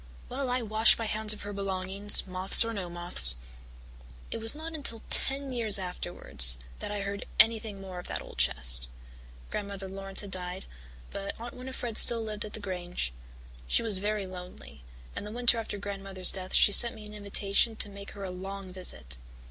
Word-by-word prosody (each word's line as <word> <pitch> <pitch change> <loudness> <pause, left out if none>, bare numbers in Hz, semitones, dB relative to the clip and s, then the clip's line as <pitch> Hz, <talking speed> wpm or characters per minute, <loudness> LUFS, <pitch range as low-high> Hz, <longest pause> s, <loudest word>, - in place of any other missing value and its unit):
Well, 265 +1 -4
I 250 0 -2
wash 220 +1 +3
my 230 - -4
hands 215 0 0
of 215 - -2
her 205 0 -7
belongings, 195 +1 +2
moths 185 +3 +3
or 230 - -4
no 190 -5 -5
moths." 175 - +7 1.0
It - - -4
was 225 +4 +4
not 320 +2 -8
until 275 -7 -2
ten 270 0 +1
years 225 -4 +4
afterwards 70 - +2 0.2
that - - -6
I 205 -1 -4
heard 200 0 -6
anything 220 -2 +3
more 190 -2 -9
of 180 - -8
the - - -4
old - - -12
chest. - - +2 0.6
Grandmother 200 -2 -6
Laurance 195 0 -3
had 200 -2 -10
died, 180 0 -5 0.5
but 200 +2 -6
Aunt 240 +3 -8
Winnifred 250 -3 0
still 230 -1 +6
lived 215 -1 -5
at 210 - -11
the - - -7
Grange. 180 - -5 0.5
She - - +1
was 210 -4 +7
very 210 0 -2
lonely, 180 - -12 0.3
and - - -5
the 210 - -8
winter 240 0 +1
after 220 -2 -6
Grandmother's 195 -2 -1
death 185 -1 -5
she - - +5
sent 235 +3 +2
me 215 -1 -11
an 210 - -7
invitation 205 +2 -1
to 215 - -3
make 200 0 -11
her 200 - -9
a 190 - -5
long 190 0 -8
visit. 65 - -2
200 Hz, 190 wpm, -28 LUFS, 185-220 Hz, 1.0 s, moths